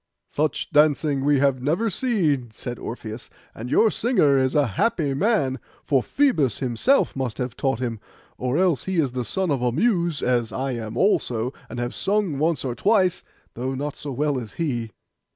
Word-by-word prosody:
'Such 150 Hz, -1 st, -1 dB
dancing 150 Hz, -2 st, +3 dB
we 145 Hz, 0 st, +3 dB
have 135 Hz, -2 st, +2 dB
never 165 Hz, -, 0 dB
seen,' 175 Hz, -, 0 dB
said 120 Hz, +2 st, -6 dB
Orpheus; 115 Hz, -1 st, -7 dB, 0.2 s
'and 115 Hz, +3 st, -7 dB
your 220 Hz, -, +4 dB
singer 210 Hz, -, +2 dB
is 130 Hz, +1 st, 0 dB
a 145 Hz, -1 st, +4 dB
happy 175 Hz, -, +1 dB
man, 140 Hz, -, +1 dB, 0.2 s
for 135 Hz, -4 st, +2 dB
Phoebus 155 Hz, -, +1 dB
himself 130 Hz, -, +1 dB
must 130 Hz, -4 st, -3 dB
have 125 Hz, -1 st, -3 dB
taught 135 Hz, -4 st, -1 dB
him, 120 Hz, -3 st, -3 dB, 0.4 s
or 125 Hz, +3 st, -1 dB
else 180 Hz, -6 st, +2 dB
he 190 Hz, -, -2 dB
is 150 Hz, -7 st, +1 dB
the 125 Hz, 0 st, -3 dB
son 185 Hz, -, -1 dB
of 135 Hz, -3 st, 0 dB
a 125 Hz, -1 st, +1 dB
Muse, 170 Hz, -, +1 dB
as 120 Hz, -3 st, +1 dB
I 130 Hz, +7 st, -2 dB
am 115 Hz, -2 st, -5 dB
also, 125 Hz, -, +1 dB, 0.2 s
and 125 Hz, -, -6 dB
have 120 Hz, 0 st, -3 dB
sung 195 Hz, -7 st, 0 dB
once 155 Hz, -3 st, 0 dB
or 125 Hz, -, -1 dB
twice, 185 Hz, -, +2 dB, 0.3 s
though 130 Hz, +3 st, -3 dB
not 145 Hz, +2 st, -4 dB
so 145 Hz, -, -5 dB
well 140 Hz, +1 st, 0 dB
as 110 Hz, -5 st, -8 dB
he. 120 Hz, -9 st, -2 dB
140 Hz, 185 wpm, -23 LUFS, 125-170 Hz, 0.4 s, your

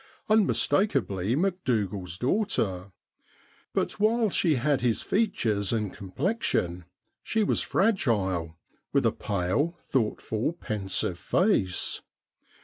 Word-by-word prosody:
Unmistak 210 Hz, -2 st, +3 dB
ably 100 Hz, -3 st, 0 dB
Macdougal's 110 Hz, -, -1 dB
daughter; 110 Hz, -, 0 dB, 0.8 s
but, -, -, -2 dB
while 220 Hz, 0 st, +2 dB
she 165 Hz, -4 st, +2 dB
had 140 Hz, +2 st, +1 dB
his 120 Hz, -2 st, +1 dB
features 110 Hz, -, +1 dB
and 105 Hz, -4 st, -1 dB
complexion, 95 Hz, -, -1 dB, 0.4 s
she 220 Hz, -1 st, 0 dB
was -, -, +1 dB
fragile, 95 Hz, -, 0 dB, 0.4 s
with -, -, +3 dB
a -, -, +4 dB
pale, 100 Hz, -, -1 dB
thoughtful, 110 Hz, +2 st, -1 dB
pensive 95 Hz, -, -2 dB
face. 170 Hz, -, +1 dB
115 Hz, 100 wpm, -27 LUFS, -, 0.8 s, a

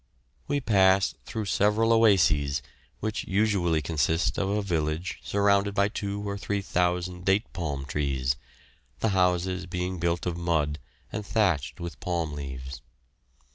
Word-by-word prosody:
We 145 Hz, 0 st, +1 dB
passed 95 Hz, -5 st, +3 dB
through 110 Hz, -2 st, -4 dB
several 105 Hz, +4 st, +3 dB
oases, 80 Hz, -11 st, +4 dB, 0.4 s
which 110 Hz, 0 st, -2 dB
usually 95 Hz, -6 st, +1 dB
consist 80 Hz, +2 st, +1 dB
of 95 Hz, -, 0 dB
a 105 Hz, +1 st, 0 dB
village 80 Hz, -1 st, -2 dB
surrounded 100 Hz, 0 st, +2 dB
by 100 Hz, 0 st, +3 dB
two 100 Hz, -1 st, -4 dB
or 100 Hz, 0 st, -3 dB
three 100 Hz, 0 st, -2 dB
thousand 90 Hz, 0 st, 0 dB
date 95 Hz, +4 st, +1 dB
palm 75 Hz, -6 st, -3 dB
trees, 70 Hz, -2 st, 0 dB, 0.6 s
the 110 Hz, -, +1 dB
houses 90 Hz, -1 st, +1 dB
being 90 Hz, +1 st, -3 dB
built 85 Hz, 0 st, 0 dB
of 90 Hz, -2 st, -1 dB
mud 80 Hz, -4 st, 0 dB, 0.3 s
and 105 Hz, -, -3 dB
thatched 95 Hz, -, 0 dB
with 85 Hz, -1 st, -6 dB
palm 85 Hz, -4 st, -2 dB
leaves. 65 Hz, -2 st, -6 dB
90 Hz, 135 wpm, -27 LUFS, 80-100 Hz, 0.6 s, oases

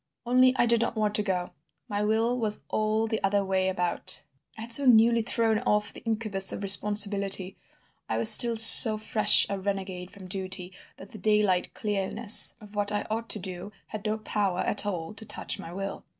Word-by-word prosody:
"Only 255 Hz, +1 st, +1 dB
I -, -, 0 dB
did 235 Hz, -1 st, 0 dB
not 235 Hz, -, -4 dB
want 210 Hz, -1 st, -4 dB
to 210 Hz, -, -1 dB
go; 185 Hz, -3 st, -6 dB, 0.4 s
my 205 Hz, -3 st, -6 dB
will 220 Hz, +3 st, -2 dB
was 215 Hz, -2 st, -4 dB
all 215 Hz, +1 st, -3 dB
the 220 Hz, -1 st, -6 dB
other 200 Hz, 0 st, -2 dB
way 190 Hz, 0 st, -3 dB
about. 180 Hz, -4 st, -4 dB, 0.3 s
I -, -, -11 dB
had 230 Hz, +1 st, -8 dB
so 275 Hz, +2 st, +3 dB
newly 230 Hz, 0 st, +2 dB
thrown 225 Hz, -1 st, -3 dB
off 210 Hz, -3 st, -3 dB
the -, -, -13 dB
incubus 215 Hz, -4 st, 0 dB
of -, -, -8 dB
responsibility: 200 Hz, -1 st, +3 dB, 0.5 s
I 110 Hz, -, -4 dB
was 115 Hz, -1 st, +1 dB
still 235 Hz, -, +7 dB
so 225 Hz, 0 st, +8 dB
fresh 215 Hz, 0 st, +4 dB
a 200 Hz, -1 st, -7 dB
renegade 190 Hz, -2 st, -8 dB
from 190 Hz, -2 st, -16 dB
duty 185 Hz, -1 st, -7 dB, 0.3 s
that 195 Hz, -, -16 dB
the 215 Hz, -, -13 dB
daylight 210 Hz, -2 st, -2 dB
clearness 210 Hz, +2 st, +2 dB
of 210 Hz, -2 st, -18 dB
what 205 Hz, 0 st, -2 dB
I 205 Hz, -, -5 dB
ought 225 Hz, +1 st, -6 dB
to -, -, -3 dB
do 185 Hz, +1 st, -10 dB
had 215 Hz, -2 st, -11 dB
no 215 Hz, +1 st, -5 dB
power 205 Hz, -4 st, -4 dB
at 205 Hz, -, +1 dB
all 175 Hz, -1 st, -7 dB
to 220 Hz, -, -12 dB
touch 220 Hz, -, -5 dB
my 165 Hz, -, -12 dB
will. 195 Hz, +2 st, -9 dB
210 Hz, 195 wpm, -24 LUFS, 195-220 Hz, 0.5 s, so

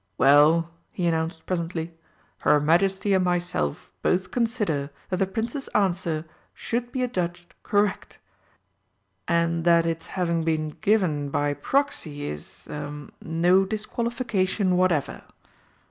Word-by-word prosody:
"Well," 150 Hz, +5 st, +5 dB, 0.2 s
he 180 Hz, -, -3 dB
announced 160 Hz, 0 st, -1 dB
presently, 170 Hz, -2 st, -3 dB, 0.5 s
"her 150 Hz, +2 st, +4 dB
Majesty 190 Hz, +6 st, +2 dB
and 190 Hz, -1 st, +3 dB
myself 175 Hz, -, -1 dB
both 180 Hz, 0 st, +1 dB
consider 210 Hz, -, 0 dB, 0.2 s
that 185 Hz, -, +1 dB
the 195 Hz, 0 st, +1 dB
Prince's 230 Hz, +7 st, -3 dB
answer 175 Hz, -5 st, +1 dB, 0.3 s
should 240 Hz, +1 st, -3 dB
be 255 Hz, -2 st, -1 dB
adjudged 175 Hz, -7 st, -3 dB
correct, 205 Hz, -1 st, 0 dB, 1.1 s
and 170 Hz, 0 st, +1 dB
that 170 Hz, -1 st, +5 dB
its 165 Hz, -1 st, -2 dB
having 170 Hz, -3 st, -1 dB
been 155 Hz, -1 st, 0 dB
given 185 Hz, -10 st, +2 dB
by 145 Hz, +1 st, 0 dB
proxy 165 Hz, -, -1 dB
is 75 Hz, 0 st, -7 dB
ah 145 Hz, -1 st, -6 dB
no 175 Hz, +4 st, +3 dB
disqualification 215 Hz, -3 st, -1 dB
whatever. 180 Hz, -5 st, +1 dB
175 Hz, 115 wpm, -25 LUFS, 160-195 Hz, 1.1 s, Well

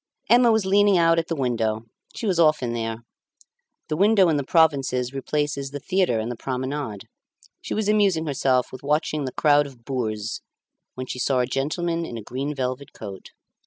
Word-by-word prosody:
Emma 240 Hz, 0 st, +6 dB
was 220 Hz, -3 st, +2 dB
leaning 200 Hz, 0 st, +4 dB
out 165 Hz, -1 st, +4 dB
at 165 Hz, -, -3 dB
the 165 Hz, -, -2 dB
window; 115 Hz, -5 st, -1 dB, 0.3 s
she -, -, -5 dB
was 185 Hz, -5 st, +1 dB
often 155 Hz, -7 st, +3 dB
there. 115 Hz, 0 st, -4 dB, 0.8 s
The 155 Hz, -, -2 dB
window 200 Hz, 0 st, +4 dB
in 155 Hz, -, +2 dB
the 140 Hz, -, -1 dB
provinces 135 Hz, -5 st, +2 dB
replaces 140 Hz, 0 st, -2 dB
the 145 Hz, +1 st, -6 dB
theatre 185 Hz, -6 st, +1 dB
and 110 Hz, +2 st, -2 dB
the -, -, -4 dB
promenade, 130 Hz, -3 st, -4 dB, 0.5 s
she -, -, -4 dB
was 215 Hz, -1 st, -1 dB
amusing 200 Hz, -6 st, +2 dB
herself 130 Hz, -3 st, +1 dB
with 130 Hz, -, -9 dB
watching 150 Hz, 0 st, 0 dB
the 130 Hz, -, -4 dB
crowd 145 Hz, -1 st, +3 dB
of 125 Hz, -4 st, -16 dB
boors 110 Hz, -5 st, -3 dB, 0.5 s
when 130 Hz, -, -5 dB
she 125 Hz, -, -6 dB
saw 130 Hz, +1 st, +1 dB
a -, -, +1 dB
gentleman 165 Hz, +6 st, -2 dB
in 120 Hz, -8 st, -6 dB
a 110 Hz, -, -7 dB
green 135 Hz, +6 st, -4 dB
velvet 130 Hz, +1 st, -4 dB
coat. 100 Hz, -3 st, -9 dB
140 Hz, 185 wpm, -24 LUFS, 125-165 Hz, 0.8 s, Emma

